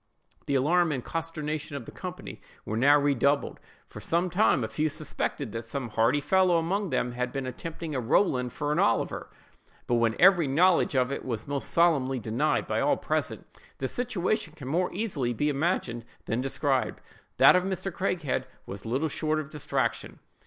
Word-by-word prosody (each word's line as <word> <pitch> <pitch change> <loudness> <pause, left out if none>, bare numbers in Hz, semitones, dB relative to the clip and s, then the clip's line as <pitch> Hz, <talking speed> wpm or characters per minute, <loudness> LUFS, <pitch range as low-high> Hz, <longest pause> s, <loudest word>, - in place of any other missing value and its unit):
The 140 - +1
alarm 165 +5 +3
and 130 -4 -3
consternation 155 -2 -4
of 130 -5 -6
the - - -9
company - - -8 0.2
were 110 - -3
now 140 +5 +5
redoubled; 140 0 +1 0.3
for - - -10
some 170 +2 0
time 185 - +3
a - - -1
few 150 +8 -1
suspected 145 -4 -3
that 115 - -4
some 120 +2 -4
hardy 115 +6 +2
fellow 185 +3 +3
among 190 +4 -1
them 125 - 0
had 125 0 -3
been 135 -2 -3
attempting 155 +5 -6
a 130 - -1
Rowland 125 - +1
for 145 +3 -3
an 150 - +1
Oliver, - - 0 0.6
but - - -1
when 115 -1 +2
every 175 -4 +6
knowledge 165 +2 +3
of 130 0 +2
it 140 - -4
was 115 -4 -4
most 140 -1 -2
solemnly 145 -6 +3
denied 110 -1 0
by - - -1
all - - +2
present, - - -2 0.3
their 130 - -2
situation 215 - -2
can 140 -5 -8
be - - -3
more 180 +3 +1
easily 155 - -2
imagined 140 -6 -1 0.2
than 115 +3 -1
described; 135 0 0 0.4
that - - +8
of 180 - +3
Mr. 190 0 -3
Craighead 175 -6 -1 0.2
was 100 +3 -8
little 135 +7 0
short 155 +1 -1
of 155 -1 -6
distraction. 150 -1 -2
145 Hz, 180 wpm, -27 LUFS, 130-170 Hz, 0.6 s, that